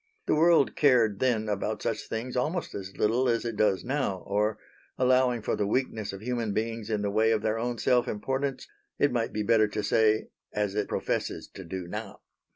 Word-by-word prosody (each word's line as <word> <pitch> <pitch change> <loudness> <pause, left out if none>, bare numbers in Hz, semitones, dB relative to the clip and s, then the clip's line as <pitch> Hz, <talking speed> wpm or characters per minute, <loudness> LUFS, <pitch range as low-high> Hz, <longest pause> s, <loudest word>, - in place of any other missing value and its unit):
The - - +2
world 160 -2 +4
cared 120 -8 +4
then 115 -4 +1
about 105 +1 -2
such 110 -2 -2
things 120 +3 -4
almost 155 +8 -1
as 95 -1 -7
little 120 +4 +2
as 115 0 0
it 115 -2 -3
does 105 -3 +2
now; 130 -8 -2
or, 105 +2 0 0.4
allowing 125 -2 +3
for - - 0
the 105 - -1
weakness 110 -2 -1
of 95 0 -8
human 120 -3 -1
beings 115 0 -3
in 105 -2 -1
the 100 - 0
way 110 +2 +3
of 110 -1 +1
their 110 +1 0
own 120 +1 -2
self 125 +1 +2
importance, 135 +6 -2 0.3
it 145 - +3
might 120 -2 -1
be 105 - -2
better 110 0 +4
to 105 +1 -3
say 110 +1 +2 0.2
as 105 -2 -1
it 105 0 -1
professes - - -2
to 95 - -10
do 90 +1 -5
now. 105 +2 -7
110 Hz, 200 wpm, -28 LUFS, 105-125 Hz, 0.4 s, world